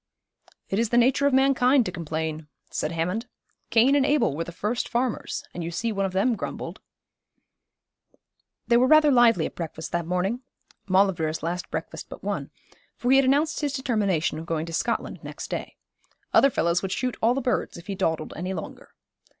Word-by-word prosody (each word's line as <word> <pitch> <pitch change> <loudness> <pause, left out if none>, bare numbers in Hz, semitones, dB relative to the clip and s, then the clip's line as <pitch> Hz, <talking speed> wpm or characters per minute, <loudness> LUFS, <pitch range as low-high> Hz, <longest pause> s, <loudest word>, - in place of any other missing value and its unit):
'It 195 - 0
is 230 -1 +1
the 240 - +2
nature 260 +3 +4
of 280 - +1
mankind 265 -1 +4
to 180 - -3
complain,' 160 -2 -4 0.2
said 155 - -2
Hammond. 180 +8 -2 0.4
'Cain 240 +5 +5
and 285 - +4
Abel 285 - +2
were 165 - -2
the 170 - -8
first 210 +7 -2
farmers, 245 -1 -2
and 175 - -5
you 165 - -3
see 230 +7 -2
one 195 -2 0
of - - -6
them 200 +6 +2
grumbled.' 200 - -6 1.8
They 235 - +4
were 255 +2 +4
rather 310 0 +6
lively 235 - +5
at - - -5
breakfast 160 -1 -6
that 170 -1 -2
morning 190 +7 -1 0.5
Maulevrier's 185 -5 +2
last 175 +2 -3
breakfast - - -5
but - - -10
one - - -3 0.5
for 245 - 0
he 270 - +7
had 270 - +5
announced 290 +4 +2
his 290 -2 -1
determination 205 - 0
of 165 - -8
going 160 -1 -1
to 165 - -8
Scotland - - -2
next - - -8
day. - - -4 0.6
Other 275 - +6
fellows 170 -7 +1
would 195 - -3
shoot 250 +3 -1
all 235 +3 +3
the - - 0
birds 250 -7 -1
if 170 - -11
he 200 - -4
dawdled 160 -4 -1
any 180 +3 -3
longer. 160 - -9
200 Hz, 190 wpm, -25 LUFS, 170-255 Hz, 1.8 s, he